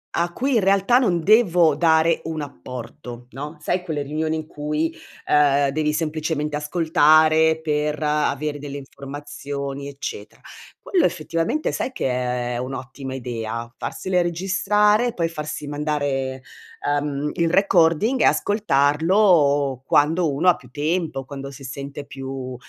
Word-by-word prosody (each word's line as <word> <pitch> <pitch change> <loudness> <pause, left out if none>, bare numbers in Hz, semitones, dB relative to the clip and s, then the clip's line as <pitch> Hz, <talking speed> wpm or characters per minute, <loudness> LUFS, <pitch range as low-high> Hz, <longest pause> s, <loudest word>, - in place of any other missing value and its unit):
a 175 +1 0
cui, 265 +8 -1
in - - +5
realtà, 195 +6 +4
non 175 -9 +1
devo 175 -7 +4
dare 160 +1 +3
un 160 -1 -3
apporto, 125 - -8
no, 145 +5 -7
sai 180 +4 -1
quelle 155 -5 -3
riunioni 155 +2 -2
in 155 -1 -4
cui, 150 +2 -2 0.3
uhm, 145 -1 +4
devi 150 +2 0
semplicemente 155 -1 -2
ascoltare 160 0 +4
per 150 0 -1
avere 150 0 0
delle 145 0 -6
informazioni, 140 0 -7
eccetera. 140 - -7 0.4
Quello, 360 -5 +1
effettivamente, 165 - -1
sai - - -3
che 260 - -2
è 125 -1 -2
un'ottima 130 +1 -6
idea? 115 -2 -5
Farsele 185 -1 -1
registrare, 210 +6 +2
poi 165 -1 0
farsi 150 -2 -5
mandare, 145 -3 -2 0.6
uhm, 145 0 -2
il 170 -1 +1
recording 190 - +3
e - - +5
ascoltarlo 150 - +3
quando 155 +3 +3
uno 150 +7 0
ha 175 - +5
più 125 - -16
tempo, 155 0 -2
quando 140 0 -7
si 140 0 -12
sente 140 +2 -7
più, 135 -2 -6
150 Hz, 130 wpm, -22 LUFS, 140-170 Hz, 0.6 s, in